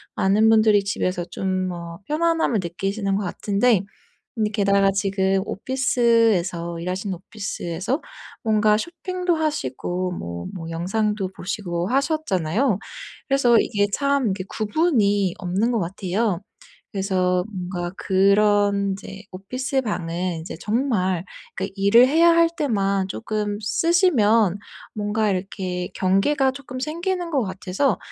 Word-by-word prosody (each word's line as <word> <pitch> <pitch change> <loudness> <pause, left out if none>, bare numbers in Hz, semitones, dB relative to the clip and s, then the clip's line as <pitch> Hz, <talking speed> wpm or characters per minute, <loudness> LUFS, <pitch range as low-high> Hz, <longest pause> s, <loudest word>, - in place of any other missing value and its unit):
많은 210 +3 +3
분들이 215 -2 +5
집에서 185 -3 -1
좀 185 0 -2
뭐 170 -2 -7
편안함을 320 -6 +1
느끼시는 195 +3 -2
것 205 - -1
같은데 200 +3 +1 0.5
근데 215 -3 0
게다가 200 -1 +3
지금 195 -1 +1
오피스에서 225 -9 +1
일하시는 185 +3 -3
오피스에서 195 - -4 0.4
뭔가 215 -2 +3
쇼핑도 360 - -2
하시고 180 - -2
뭐 85 - -6
뭐 165 -3 -6
영상도 195 +4 -1
보시고 175 -2 -3
하셨잖아요. 255 - +1 0.5
그래서 250 -4 +4
이게 205 -2 +1
참 280 -4 +1
이게 190 -1 -3
구분이 210 - +1
없는 190 +5 0
것 235 - +1
같아요. 190 +2 -1 0.5
그래서 185 -2 +1
뭔가 180 -2 -4
그런 200 +1 +3
인제 195 +1 -8
오피스 255 +9 -2
방은 175 -4 -2
인제 160 0 -7
정말 210 -6 0 0.3
그 195 +1 -3
일을 205 +6 +5
해야 330 +4 +5
할 335 0 +5
때만 200 -8 0
쪼끔 210 0 -3
쓰시면 225 - +3 0.4
뭔가 210 0 0
이렇게 185 -1 -3
경계가 260 +9 +2
쪼끔 260 -1 -8
생기는 345 +4 -2
것 280 -5 +1
같아서 190 +7 -1
205 Hz, 275 characters per minute, -23 LUFS, 185-240 Hz, 0.5 s, 분들이